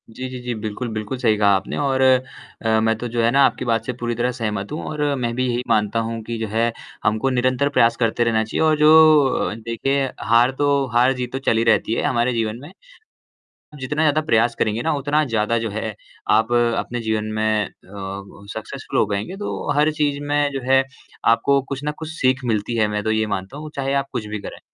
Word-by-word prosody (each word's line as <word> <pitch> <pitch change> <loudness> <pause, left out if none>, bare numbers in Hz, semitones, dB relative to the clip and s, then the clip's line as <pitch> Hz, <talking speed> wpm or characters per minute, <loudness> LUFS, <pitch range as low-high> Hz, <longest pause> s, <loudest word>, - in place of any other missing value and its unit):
जी, 130 +3 -6
जी, 130 0 -7
जी। 125 0 -3
बिल्कुल, 110 +3 -4
बिल्कुल 110 +4 -4
सही 115 -4 +2
कहा 105 -1 +3
आपने 95 +1 -3
और 135 -2 0
अ, 125 -3 +1
मैं 110 0 +2
तो 120 - -4
जो 120 0 -1
है 115 - +4
ना 140 +2 +4
आपकी - - -1
बात 115 -2 0
से 125 - -3
पूरी 120 -1 -3
तरह 120 +2 0
सहमत 105 -5 -4
हूँ 150 - -4
और 150 -1 -4
मैं 120 -3 -2
भी 130 +1 0
यही 120 0 -1
मानता 105 0 +2
हूँ 115 0 -4
कि 115 +1 -5
जो 110 0 -3
है, 115 +3 0 0.3
हमको 110 +5 +1
निरंतर 130 +2 +1
प्रयास 115 -4 +3
करते 115 0 +1
रहना 115 -1 +2
चाहिए 110 - -3
और 155 -1 +3
जो 155 -1 +7
अ, 125 - -1
देखें 130 +4 -2
हार 120 +2 +5
तो, 140 -1 +2
हार-जीत 125 +1 +2
तो 135 - -2
चली 115 0 +2
रहती 115 -1 +2
है - - -1
हमारे 120 +1 +1
जीवन 115 -1 -1
में। 145 - -10 1.0
हम 150 - -12
जितना 150 +4 -2
ज़्यादा 155 0 +3
प्रयास 115 -5 +2
करेंगे 110 +1 0
ना 160 - +1
उतना 145 +2 +1
ज़्यादा 115 -2 0
जो 115 -1 -2
है 110 +1 -4 0.4
आप 110 +2 +3 0.3
अपने 120 - -3
जीवन 110 -1 -1
में 110 -1 +1
अ, - - -10 0.2
ब 100 +1 -8
सक्सेस्फ़ुल 130 +5 -4
हो - - +4
पाएँगे, 105 - -4
तो 205 -7 -3
हर 150 +2 +3
चीज़ 145 -2 -1
में 145 0 +1
जो 135 - -3
है 135 0 +5 0.5
आपको 140 +4 +2
कुछ 140 0 -4
न 150 - 0
कुछ 160 -1 -6
सीख 130 -4 0
मिलती 110 0 -1
है, 110 -2 +3
मैं 105 0 -2
तो 110 - 0
ये 110 0 +1
मानता 95 +7 -7
हूँ, 155 +1 -7
चाहे 135 0 -1
आप - - -23
कुछ 110 - -3
भी 105 0 -4
करें। - - -8
120 Hz, 225 wpm, -21 LUFS, 110-135 Hz, 1.0 s, जो